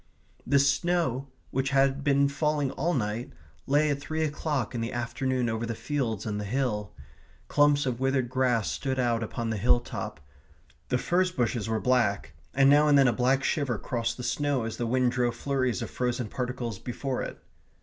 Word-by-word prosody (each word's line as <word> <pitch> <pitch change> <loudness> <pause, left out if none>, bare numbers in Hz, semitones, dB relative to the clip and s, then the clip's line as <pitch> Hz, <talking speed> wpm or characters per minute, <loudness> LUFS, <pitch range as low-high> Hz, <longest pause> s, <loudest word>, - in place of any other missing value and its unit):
The 140 - +4
snow, 140 -1 +1 0.2
which 135 +1 0
had 135 0 +2
been 140 0 +3
falling 145 -1 0
all 170 +4 -1
night, 110 0 -2 0.4
lay 145 +2 +3
at 140 - -1
three 160 +2 -2
o'clock 150 -4 -2
in 120 - -2
the 115 - -2
afternoon 125 +1 -1
over 110 0 -2
the 115 - -3
fields 120 -7 -2
and 105 -1 -2
the - - -3
hill. 105 -2 -1 0.6
Clumps 145 0 +3
of 125 -2 -2
withered 135 -1 +1
grass 125 -3 +1
stood 135 -1 -2
out 120 -2 +1
upon 115 +1 -3
the 110 - -1
hill 120 +4 +4
top; 120 - -6 0.7
the 125 - +2
furze 180 +7 +1
bushes 120 - -1
were 110 -1 0
black, 105 -10 +1 0.2
and 135 0 +5
now 145 +2 +6
and 145 -1 +6
then 135 -1 +6
a 120 - +3
black 130 +2 +2
shiver 135 -7 0
crossed 115 +1 -2
the 125 - -6
snow 145 -2 0
as 115 0 -4
the 120 - -2
wind 125 +1 +2
drove 120 -2 0
flurries 130 -4 -1
of - - -7
frozen 125 -2 -2
particles 125 -4 -4
before 130 +1 -3
it. - - -5
130 Hz, 190 wpm, -28 LUFS, 115-140 Hz, 0.7 s, now